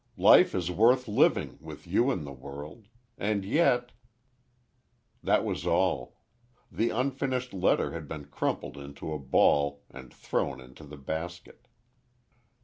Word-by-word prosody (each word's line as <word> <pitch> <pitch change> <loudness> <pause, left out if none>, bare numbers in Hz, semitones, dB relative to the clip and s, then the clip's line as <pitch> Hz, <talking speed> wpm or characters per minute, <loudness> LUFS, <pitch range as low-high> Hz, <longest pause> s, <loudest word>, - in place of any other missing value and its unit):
Life - - +6
is 90 -1 -1
worth 120 +7 +3
living—with 105 - 0
you 120 +3 +2
in 90 - -1
the 70 - -7
world! 70 - -10 0.3
And 100 -1 -1
yet— 125 - +2 1.3
That - - +2
was - - -3
all. - - 0 0.6
The 115 +1 0
unfinished 130 0 -2
letter 95 -2 +1
had 80 -3 -7
been 75 -1 -7
crumpled 75 - -3
into 70 +2 -7
a 75 - -4
ball 70 +1 +2
and 65 -1 -11
thrown 65 - -2
in 65 0 -14
the 75 +1 -12
basket. 80 +5 -7
85 Hz, 130 wpm, -28 LUFS, 70-120 Hz, 1.3 s, Life